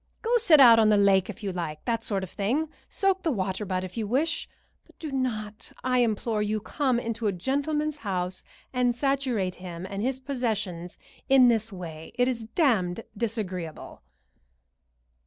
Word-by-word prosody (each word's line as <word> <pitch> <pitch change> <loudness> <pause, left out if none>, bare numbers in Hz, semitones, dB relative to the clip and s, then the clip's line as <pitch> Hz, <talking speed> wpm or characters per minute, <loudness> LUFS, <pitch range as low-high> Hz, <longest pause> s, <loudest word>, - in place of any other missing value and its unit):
Go 475 +1 +2
sit 345 -10 +6
out 235 -4 +9
on 215 -1 +5
the 210 - +5
lake, 195 -2 +4
if 230 - -8
you 195 - -2
like 165 -4 -5
that 230 -2 -1
sort 195 -3 -1
of 185 - -7
thing; 260 +10 -1 0.2
soak 390 -2 +1
the 335 - 0
water 195 -4 -2
butt, 185 -1 -2
if 185 +4 -8
you 220 -2 -2
wish; 285 +9 0 0.3
but - - -24
do 310 -3 -6
not, 215 -6 -3
I 255 -1 +2
implore 220 -1 +1
you, 210 +1 0
come 255 +3 0
into 230 -1 -2
a - - +2
gentleman's 285 - -1
house 185 -6 -3 0.3
and 250 -1 +2
saturate 255 -8 0
him 175 -1 -6
and 195 +1 -4
his 260 +3 -1
possessions 215 -10 -3 0.3
in 260 -2 +7
this 225 -1 +1
way. 165 -4 -8
It 245 0 +2
is 235 -3 -2
damned 225 - +1
disagreeable." 195 -7 -4
225 Hz, 175 wpm, -27 LUFS, 190-260 Hz, 0.3 s, out